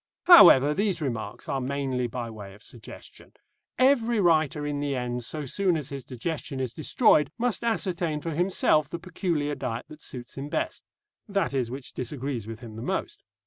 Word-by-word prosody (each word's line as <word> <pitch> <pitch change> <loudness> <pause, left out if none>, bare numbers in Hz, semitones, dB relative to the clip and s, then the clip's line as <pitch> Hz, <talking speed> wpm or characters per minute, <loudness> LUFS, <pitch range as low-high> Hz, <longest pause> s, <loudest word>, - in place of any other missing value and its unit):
However, 150 - +9
these 200 +1 0
remarks 125 -8 -4
are 135 - -1
mainly 130 -2 -2
by 120 0 -5
way 100 -3 -10
of 105 - -16
suggestion. 120 -3 -12 0.4
Every 240 -4 +3
writer 155 -5 +2
in 145 -1 -2
the 145 -1 -1
end, 125 -1 -3
so 150 +5 -4
soon 180 +5 +1
as 150 -2 -5
his 140 -2 -6
digestion 140 +2 -5
is 130 -3 -3
destroyed, 155 - +3
must 240 -1 -1
ascertain 180 -8 -1
for 165 +2 -4
himself 155 -3 +2
the 170 - -4
peculiar 165 -4 -2
diet 125 -4 -4
that 155 0 -12
suits 125 +1 -8
him 140 +2 -5
best 320 - -3 0.5
that 195 -7 0
is, 130 -4 -1
which 130 +1 -7
disagrees 125 -3 -4
with 115 +2 -8
him 110 -3 -10
the - - -6
most. - - -3
145 Hz, 180 wpm, -26 LUFS, 125-170 Hz, 0.5 s, However